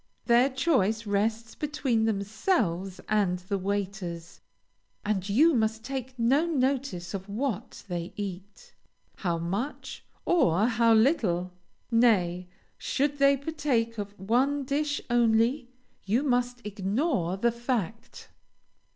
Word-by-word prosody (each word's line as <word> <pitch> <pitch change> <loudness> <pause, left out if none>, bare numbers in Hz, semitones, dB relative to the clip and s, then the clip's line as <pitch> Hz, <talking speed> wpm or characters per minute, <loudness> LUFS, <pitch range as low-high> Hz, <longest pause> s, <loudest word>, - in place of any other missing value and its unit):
Their 240 +3 +5
choice 240 - +1
rests 220 +2 -1
between 270 -7 0
themselves 200 - -1
and 200 -4 +1
the 190 +2 -3
waiters, 190 -3 -4 0.6
and 200 -2 -1
you 305 +11 +5
must 220 -2 0
take 260 0 -5
no 265 +8 +3
notice 260 - -1
of 195 0 -6
what 235 +1 -3
they 175 -1 -4
eat, 200 0 -7 0.4
how 175 -3 -1
much, 195 - -4 0.2
or 205 - +3
how 230 -1 +3
little. 200 - +2 0.4
Nay, 185 -7 +3 0.3
should 285 +1 -1
they 275 0 +5
partake 270 -7 -1
of 205 -1 -6
one 260 +8 +1
dish 290 +2 -1
only, 240 +2 +2 0.3
you 225 +8 +1
must 245 -3 0
ignore 200 - -1
the 235 +4 +2
fact. 230 -3 -4
225 Hz, 115 wpm, -28 LUFS, 195-260 Hz, 0.6 s, Their